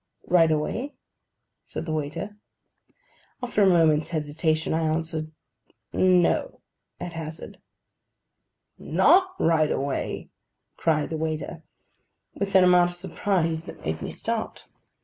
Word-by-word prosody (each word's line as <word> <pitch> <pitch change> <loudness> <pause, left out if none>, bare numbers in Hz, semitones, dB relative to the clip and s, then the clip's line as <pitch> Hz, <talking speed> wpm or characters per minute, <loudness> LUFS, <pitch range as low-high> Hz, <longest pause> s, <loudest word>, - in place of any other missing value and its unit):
'Right 170 -2 +4
away?' 185 - -2 0.7
said - - -6
the 160 - -4
waiter. 155 +7 -3 1.1
After 240 -3 0
a 200 - +6
moment's 160 -4 +4
hesitation, 155 0 -1
I 160 - +1
answered 160 0 -2 0.6
'No,' 185 - +2 0.4
at 175 - -6
hazard. 160 -1 -7 1.2
'Not 375 +1 +4
right 160 -2 +3
away?' 140 0 -3 0.4
cried 155 -2 0
the 160 - -2
waiter, 160 +1 -3 0.7
with 200 -1 -3
an 190 - +8
amount 180 -1 +5
of 175 - -10
surprise 175 -3 -1
that - - -11
made 80 +1 -2
me - - -4
start. - - -4
165 Hz, 115 wpm, -25 LUFS, 155-180 Hz, 1.2 s, an